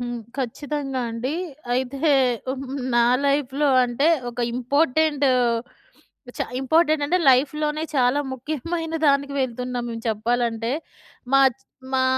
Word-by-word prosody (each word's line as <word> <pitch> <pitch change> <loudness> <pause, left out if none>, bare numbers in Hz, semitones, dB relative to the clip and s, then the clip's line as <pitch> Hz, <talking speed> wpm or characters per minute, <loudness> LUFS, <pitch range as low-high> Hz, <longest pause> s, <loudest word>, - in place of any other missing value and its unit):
హ్మ్. 240 0 -4 0.2
ఖచ్చితంగా 270 +1 -3
అండి. 240 +6 -3 0.4
అయితే 260 +2 -2 0.5
హ్మ్, 270 +1 -4 0.3
నా 235 - +5 0.2
లైఫ్‌లో 280 +1 +1 0.2
అంటే 245 +5 +1 0.2
ఒక 240 - -6
ఇంపార్టెంట్, 285 +3 +1 1.1
చ - - -6 0.2
ఇంపార్టెంట్ 310 +2 +2
అంటే 355 +5 +2
లైఫ్‌లోనే 300 +4 +1
చాలా 255 +2 +3
ముఖ్యమైన 315 +5 -4
దానికి 280 0 +2
వెళ్తున్నాం 250 -1 -3
మెం 230 -1 -5
చెప్పాలంటే, 230 +1 -1 0.6
మాచ్ 270 -1 +4 0.3
మా 260 0 +3
270 Hz, 110 wpm, -23 LUFS, 245-295 Hz, 1.1 s, నా